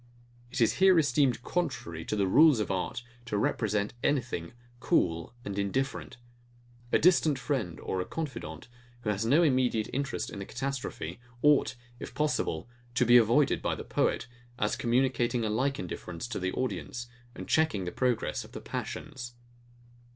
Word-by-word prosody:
It 130 +2 -4
is 115 - +4
here 190 -2 +7
esteemed 135 -5 +2
contrary 135 - -2
to - - -1
the 100 -2 +2
rules 145 +6 +6
of 105 - -1
art 95 +5 -2 0.2
to 110 -4 -2
represent 105 0 0
anything 120 - -1 0.3
cool 85 - +1
and 100 0 -3
indifferent. 130 +9 -2 0.7
A - - +5
distant 160 -4 +4
friend, 125 - -2
or 95 - -2
a - - -3
confident, 115 - -6 0.3
who 105 - 0
has 105 +2 -1
no 150 +8 +5
immediate 125 -7 +2
interest 135 +1 -2
in - - -7
the 100 - -5
catastrophe, 120 -9 -4 0.2
ought, 150 -3 +4 0.2
if - - -8
possible, 125 - 0 0.3
to 125 - +3
be 120 +1 +8
avoided 120 +5 +4
by - - 0
the - - -7
poet; - - 0 0.3
as 105 -2 0
communicating 120 -1 +1
a 105 - 0
like 135 +5 0
indifference 90 +2 -6
to - - -3
the 95 0 -1
audience, 125 -1 -3 0.3
and - - -7
checking 155 - +2
the 90 - -3
progress 125 -3 0
of - - -15
the - - -5
passions. 130 -5 -6
120 Hz, 160 wpm, -29 LUFS, 100-140 Hz, 0.7 s, be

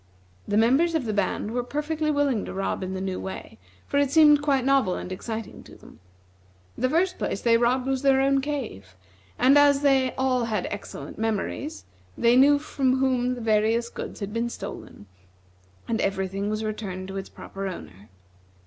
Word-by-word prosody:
The 205 - +1
members 270 +10 +3
of 300 -6 0
the 215 - -2
band 205 +1 -1
were 245 +1 -1
perfectly 300 +4 -2
willing 285 -6 +1
to - - -7
rob 195 0 -2
in 190 0 -4
the - - -3
new 190 -1 -3
way, 190 - -8 0.3
for 285 - 0
it 285 -1 +2
seemed 295 0 +6
quite 275 -3 +1
novel 270 -9 +3
and 180 - -6
exciting 220 +3 -6
to - - -14
them. - - -17 0.8
The 255 - 0
first 360 +5 +1
place - - -2
they 235 -1 +4
robbed 245 +2 +2
was 265 -1 -1
their 270 -1 +4
own 275 0 +3
cave, 245 - -5 0.4
and 275 +3 +5
as 285 -1 +5
they 265 -2 +3
all 255 -2 +1
had 215 -5 -2
excellent 205 0 -7
memories, 225 +8 -3 0.3
they 235 +1 +4
knew 285 +3 +6
from 270 -3 0
whom 255 -1 +1
the 245 - -8
various 225 +2 +1
goods - - -7
had 200 +1 -4
been 230 +1 -1
stolen, 100 - -8 0.8
and 225 0 -1
every 195 -1 0
thing 195 +2 -3
was 215 +1 -2
returned 200 -4 -5
to 195 - -5
its 195 - -6
proper 195 0 -7
owner. 100 - -9
245 Hz, 185 wpm, -25 LUFS, 205-275 Hz, 0.8 s, seemed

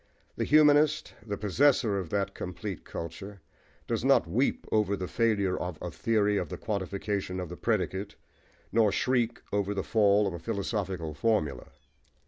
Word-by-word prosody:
The - - -1
humanist, 150 0 +4
the 105 -2 -4
possessor 110 0 +2
of 90 -4 -5
that 100 0 -1
complete 95 +1 -6
culture, 95 +5 -7 0.5
does - - -2
not - - +4
"weep" 120 +11 0
over 105 -2 +2
the 90 - -4
failure 105 -5 +1
of 90 -3 -4
"a 90 - -5
theory 105 +3 +1
of - - -2
the - - -5
quantification 100 -2 -3
of 90 -3 -5
the 90 - -6
predicate," 100 -2 -1 0.6
nor 110 -3 +4
"shriek" 120 +1 0
over 100 0 0
the 95 - -1
fall 105 -1 +3
of 95 - -2
a 85 - -6
philosophical 95 -5 -3
formula. 80 -5 0
100 Hz, 155 wpm, -29 LUFS, 95-110 Hz, 0.6 s, humanist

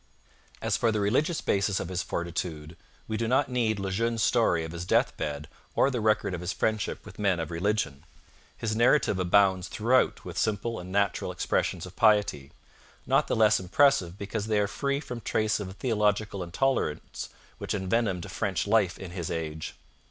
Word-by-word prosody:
As - - +1
for 115 - +2
the 110 - 0
religious 140 - +1
basis 100 0 +1
of 85 - -4
his 90 -1 -1
fortitude, 85 -2 -4 0.3
we 110 - -2
do 115 - -1
not 130 +3 +2
need 115 -4 +1
Le 95 -1 -3
Jeune's 115 +2 0
story 90 -10 +2
of 80 - -7
his 85 0 -5
death 90 - +2
bed 75 0 -4 0.3
or 140 - +3
the 125 -3 -2
record 105 -3 +2
of 90 - -4
his 90 +2 -2
friendship 110 +1 -1
with - - -12
men 100 -4 +2
of 80 -1 -4
religion. 85 -5 -1 0.5
His 110 -1 -2
narrative 120 -3 +3
abounds 95 0 +3
throughout 125 +4 +1
with - - -4
simple 110 +2 -1
and 90 +1 -8
natural 100 -1 0
expressions - - -1
of 90 0 -12
piety, 105 -11 +2 0.5
not - - +2
the - - 0
less 110 -1 +4
impressive 95 -2 +2
because 100 +1 -4
they 110 -1 +1
are 105 - +3
free 140 +6 -1
from 125 -5 -7
trace 110 -1 0
of 100 - -4
the 95 - -8
theological 105 -3 0
intolerance 90 - -1 0.3
which - - -2
envenomed 95 -2 -1
French 95 -4 -1
life 100 -3 +2
in 95 -2 -8
his 90 -3 -4
age. 80 -1 -4
100 Hz, 180 wpm, -28 LUFS, 90-110 Hz, 0.5 s, less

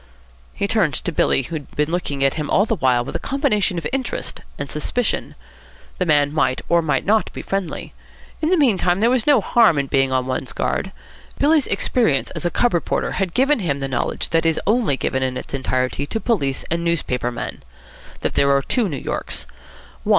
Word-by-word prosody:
He 200 - -1
turned 195 -9 +2
to 180 - -1
Billy, 135 - +2
who 165 - -8
had 145 -3 -8
been 150 +2 0
looking 145 -6 -1
at 135 - +3
him 150 -2 -4
all 200 - +4
the 225 - 0
while 125 -7 +2
with - - -7
a - - 0
combination 225 - 0
of 165 - -4
interest 265 -2 -3 0.2
and 140 - -4
suspicion. 210 - -2 0.6
The 180 - 0
man 145 -2 +3
might 150 -4 +1
or 170 0 +4
might 150 -5 0
not 215 +2 +2
be - - -6
friendly. 195 -4 -4 0.5
In 315 - +1
the 370 - +4
meantime, 195 - +2
there 230 +3 +3
was 255 -1 +1
no 290 - +6
harm 225 - +4
in 140 - +1
being 135 -1 +1
on 130 -1 +1
one's 130 0 -3
guard. - - -2 0.5
Billy's 300 0 +3
experience 160 - +1
as - - -5
a - - 0
cub 240 +6 +1
reporter 170 - 0
had 185 -3 -2
given 275 +1 +3
him 145 -8 -1
the 135 - -2
knowledge 130 - -2
that 165 -1 +2
is 165 -1 +2
only 215 - +2
given 130 - -1
in 130 -1 -1
its - - -8
entirety 130 +1 -1
to 225 - -2
police 160 - -1
and 170 0 0
newspaper 130 -8 -1
men: 120 - -6 0.6
that - - -1
there 140 - +3
are 140 - -1
two 230 - 0
New 145 - -4
Yorks. - - -4
165 Hz, 205 wpm, -21 LUFS, 135-220 Hz, 0.6 s, no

